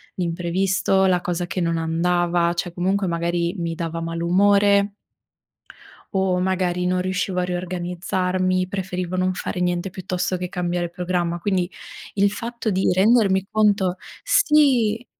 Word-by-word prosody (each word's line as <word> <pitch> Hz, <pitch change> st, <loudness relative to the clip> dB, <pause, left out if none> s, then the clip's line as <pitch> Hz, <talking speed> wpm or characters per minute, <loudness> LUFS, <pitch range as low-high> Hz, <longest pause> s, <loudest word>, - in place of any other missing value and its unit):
l'imprevisto, 185 Hz, +2 st, +1 dB
la 180 Hz, -2 st, +2 dB
cosa 175 Hz, 0 st, -2 dB
che 185 Hz, -, -3 dB
non 165 Hz, -1 st, 0 dB
andava, 170 Hz, +1 st, +1 dB
cioè 175 Hz, 0 st, -4 dB
comunque 190 Hz, +2 st, 0 dB
magari 170 Hz, +1 st, -1 dB
mi 170 Hz, -1 st, -2 dB
dava 165 Hz, 0 st, -4 dB
malumore 200 Hz, +4 st, +3 dB, 1.2 s
o 190 Hz, -1 st, +1 dB
magari 180 Hz, -1 st, 0 dB
non 180 Hz, 0 st, +1 dB
riuscivo 185 Hz, 0 st, -1 dB
a -, -, +1 dB
riorganizzarmi, 180 Hz, +1 st, -1 dB
preferivo 185 Hz, -2 st, -3 dB
non 185 Hz, 0 st, +1 dB
fare 180 Hz, -, -4 dB
niente 180 Hz, +1 st, -1 dB
piuttosto 185 Hz, 0 st, -3 dB
che 180 Hz, -, -4 dB
cambiare 175 Hz, -1 st, -2 dB
programma. 175 Hz, -1 st, -2 dB
Quindi 185 Hz, -1 st, 0 dB, 0.4 s
il 200 Hz, 0 st, +2 dB
fatto 235 Hz, +1 st, -4 dB
di 190 Hz, +1 st, +1 dB
rendermi 195 Hz, -1 st, +3 dB
conto 205 Hz, -4 st, +2 dB, 0.3 s
sì. 275 Hz, -, +3 dB
180 Hz, 130 wpm, -22 LUFS, 175-195 Hz, 1.2 s, malumore